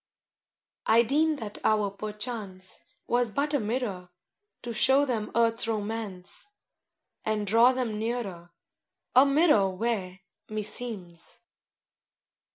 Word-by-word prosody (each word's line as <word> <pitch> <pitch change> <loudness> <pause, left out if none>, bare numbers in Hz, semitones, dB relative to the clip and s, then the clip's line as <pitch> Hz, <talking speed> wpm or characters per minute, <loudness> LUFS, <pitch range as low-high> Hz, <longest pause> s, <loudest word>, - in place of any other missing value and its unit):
V - - -67 0.9
I 230 +1 +7
deem 305 +6 +2
that 220 -6 -7
hour 210 -2 +2
perchance 210 -2 -5 0.3
Was 240 -1 +1
but 285 +7 -1
a 290 - +3
mirror 210 -5 -3 0.5
To 240 -1 -4
show 265 +5 +4
them 225 -5 -2
Earth's 230 0 +3
romance 215 - -4 0.8
And 215 -1 -1
draw 230 +5 +6
them 245 -5 -2
nearer: 215 -7 -4 0.6
A 260 +2 +8
mirror 275 - +4
where, 190 -2 -2 0.3
meseems. 210 -5 -3
220 Hz, 110 wpm, -28 LUFS, 200-245 Hz, 0.9 s, A